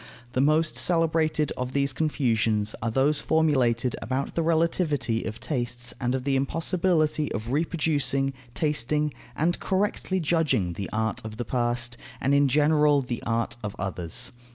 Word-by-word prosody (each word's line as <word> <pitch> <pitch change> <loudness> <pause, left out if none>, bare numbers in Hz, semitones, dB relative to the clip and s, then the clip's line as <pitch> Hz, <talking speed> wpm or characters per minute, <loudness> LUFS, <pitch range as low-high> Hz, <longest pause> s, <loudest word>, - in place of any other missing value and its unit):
The 130 - +2
most 155 +3 +2
celebrated 160 -3 +1
of 125 0 -4
these 140 -1 +1
confusions 115 -8 +1
are 115 - 0
those 135 +5 +3
formulated 130 -7 +2
about 130 +2 -2
the 170 - 0
relativity 160 -8 +1
of 110 +1 -5
tastes 120 -2 -3
and 125 0 +1
of 130 - -3
the 140 0 +1
impossibility 155 +2 +1
of 115 +1 -4
reproducing, 145 -3 +1 0.2
tasting, 150 0 0 0.2
and 170 +5 +1
correctly 190 -1 0
judging 155 - +1
the 100 +3 -5
art 110 0 -1
of 110 0 -7
the 120 - -3
past, 120 -1 -1 0.2
and 135 - +1
in 140 0 +5
general 150 0 +4
the 120 -2 -4
art 115 +1 0
of 105 -2 -4
others. 95 +6 -2
140 Hz, 150 wpm, -26 LUFS, 120-155 Hz, 0.2 s, in